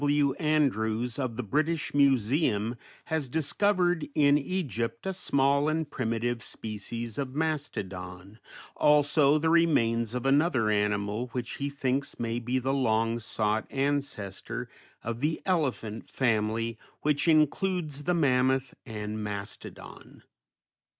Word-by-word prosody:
W. 145 -1 +3
Andrews 125 -6 +1
of 125 -4 -2
the 125 - -3
British 155 +8 0
Museum 130 -4 +2 0.3
has 160 -5 -2
discovered 175 +3 +1
in 145 -1 +5
Egypt 140 - -2
a 190 - -1
small 140 -3 +2
and 160 0 -1
primitive 115 0 -1
species 115 +1 -5
of 135 -1 -4
mastodon, 100 - -4 0.4
also 150 0 +4
the 160 +1 +1
remains 115 -9 +2
of 125 +1 -3
another 135 -5 +3
animal 105 +2 0
which 125 -2 -4
he 140 +1 -2
thinks 140 0 -2
may 115 0 -1
be 120 +2 -1
the 130 +1 0
long 115 -3 +1
sought 110 -1 -1
ancestor 135 -8 -2 0.4
of 115 0 -4
the 150 +4 0
elephant 130 - -1
family, 115 -2 0 0.2
which 150 +1 +1
includes 155 -1 +1
the 180 - +2
mammoth 130 -3 +2
and 105 -1 -4
mastodon. 100 -1 -8
130 Hz, 120 wpm, -28 LUFS, 115-150 Hz, 0.4 s, in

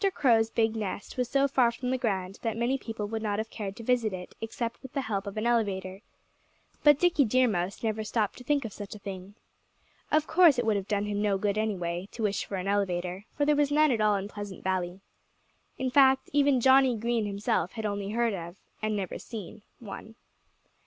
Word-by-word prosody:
Crow's 225 -5 +3
big 225 -1 +1
nest 205 -2 -4
was 250 -2 -1
so 275 0 +3
far 255 -3 +3
from 250 +2 -4
the 260 - +1
ground 195 -5 -2
that 225 -1 -2
many 240 +3 +1
people 225 -4 -5
would 220 +1 -3
not 205 -2 -1
have 220 +1 -4
cared 200 -3 -5
to 230 - -9
visit 235 -2 +1
it 180 -1 -7
except 230 +1 -4
with 265 - -11
the 275 - 0
help 205 -5 -3
of 200 - -6
an 215 - -1
elevator. 195 -5 0 0.8
But 295 -2 +7
Dickie 350 -3 +3
Deer 255 +2 +3
Mouse 185 -1 -2
never 220 -1 -1
stopped 215 0 -1
to - - -10
think 280 0 +1
of 215 - -6
such 205 0 -8
a - - -8
thing. 195 0 -8 0.8
Of 310 0 +3
course 325 -5 +5
it 245 - 0
would 220 -1 +2
have 200 -1 -2
done 205 0 0
him 205 0 -2
no 205 -2 +2
good, 200 0 0
anyway, 190 -4 -2
to 230 - -5
wish 205 -1 0
for 200 - -5
an 185 0 -3
elevator, 185 -1 -1
for 290 - +2
there 300 0 +4
was 290 -1 +2
none 305 0 +4
in 225 -3 +1
all 205 -2 +2
Pleasant 205 -2 -8
Valley. 185 0 -2 0.8
In 260 -1 -2
fact, 265 -1 +4
even 280 -3 +4
Johnnie 260 -1 +5
Green 230 -1 0
himself 200 -2 -1
had 220 -2 -5
only 200 -1 -2
heard 230 +1 +1
of 175 -1 -6 0.3
and 215 0 0
never 195 -3 -3
seen 215 -2 -8 0.2
one. 220 0 -9
220 Hz, 215 wpm, -28 LUFS, 200-250 Hz, 0.8 s, But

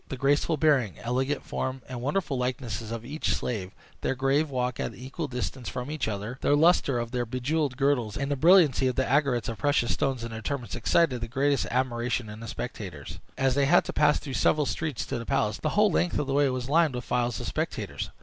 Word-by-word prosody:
The 135 - -4
graceful 145 +4 +2
bearing, 135 - +2
elegant 130 +4 -1
form, 130 0 -3
and 125 -2 -6
wonderful 145 +2 -1
likeness 125 -4 -3
of 115 0 -5
each 150 +5 -1
slave; 100 -6 -3 0.3
their - - 0
grave 135 +4 +1
walk 125 -2 -2
at - - -2
an - - -14
equal 135 +5 -5
distance 125 0 -4
from 125 +3 -5
each 155 - -2
other; 110 +4 -4
the 145 - +3
lustre 150 -4 +4
of 120 -1 -3
their 125 -1 0
jewelled 130 +3 -1
girdles, 135 -6 +1
and 140 +1 -2
the - - +2
brilliancy 155 -4 +5
of 130 - -1
the 130 - +1
aigrettes 135 -4 +1
of 115 - -5
precious 145 -5 +2
stones 130 -4 -1
in 115 - -5
their 110 0 -6
turbans, 130 0 -4
excited 125 +1 +2
the 115 - -3
greatest 140 +3 +1
admiration 120 -2 -1
in 105 +1 -8
the 115 - -8
spectators. - - -6 0.2
As 135 -1 +2
they 140 +1 +2
had 170 +6 +4
to - - -5
pass 150 -1 +4
through 140 -3 -7
several 150 +3 +2
streets 150 -4 -2
to - - -3
the 115 - -6
palace, 110 -6 0
the 155 - -1
whole 210 -1 +5
length 175 0 +1
of 150 - 0
the 135 - -2
way 140 0 +3
was 130 -1 -3
lined 155 -1 +3
with 125 - -4
files 120 -3 0
of - - -5
spectators. - - -3
130 Hz, 225 wpm, -27 LUFS, 120-145 Hz, 0.3 s, brilliancy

